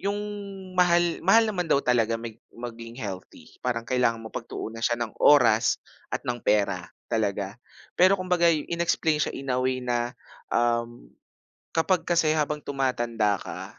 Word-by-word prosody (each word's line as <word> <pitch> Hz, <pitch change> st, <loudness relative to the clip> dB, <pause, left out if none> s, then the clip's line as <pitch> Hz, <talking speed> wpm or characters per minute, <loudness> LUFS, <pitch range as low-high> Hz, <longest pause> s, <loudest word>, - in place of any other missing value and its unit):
yung 200 Hz, +2 st, -1 dB, 0.6 s
mahal 175 Hz, -1 st, +3 dB
mahal 220 Hz, +6 st, +5 dB
naman 185 Hz, -6 st, -2 dB
daw -, -, +4 dB
talaga 115 Hz, -2 st, +2 dB
mag 115 Hz, 0 st, -7 dB, 0.2 s
maging 115 Hz, -1 st, -9 dB
healthy, 100 Hz, -7 st, -8 dB
parang 115 Hz, -2 st, -2 dB
kailangan 115 Hz, -2 st, 0 dB
mong 110 Hz, -, -9 dB
pagtuunan 115 Hz, +1 st, -7 dB
siya 120 Hz, +1 st, +1 dB
ng 120 Hz, -2 st, -4 dB
oras 120 Hz, -6 st, +5 dB, 0.3 s
at -, -, -4 dB
ng 120 Hz, -1 st, -3 dB
pera 100 Hz, -4 st, +1 dB, 0.2 s
talaga, 105 Hz, 0 st, -1 dB, 0.3 s
pero 185 Hz, +2 st, +5 dB
kumbaga 180 Hz, -2 st, +2 dB
in-explain 165 Hz, -1 st, +1 dB
siya -, -, -1 dB
in 135 Hz, -1 st, -3 dB
a 125 Hz, -, +1 dB
way 130 Hz, 0 st, 0 dB
na 120 Hz, 0 st, -1 dB, 0.3 s
um, 120 Hz, 0 st, -1 dB, 0.6 s
kapag 165 Hz, +2 st, +1 dB
kasi 165 Hz, -2 st, +2 dB
habang 150 Hz, -1 st, 0 dB
tumatanda 120 Hz, -7 st, 0 dB
ka, -, -, -8 dB
125 Hz, 150 wpm, -26 LUFS, 115-165 Hz, 0.6 s, mahal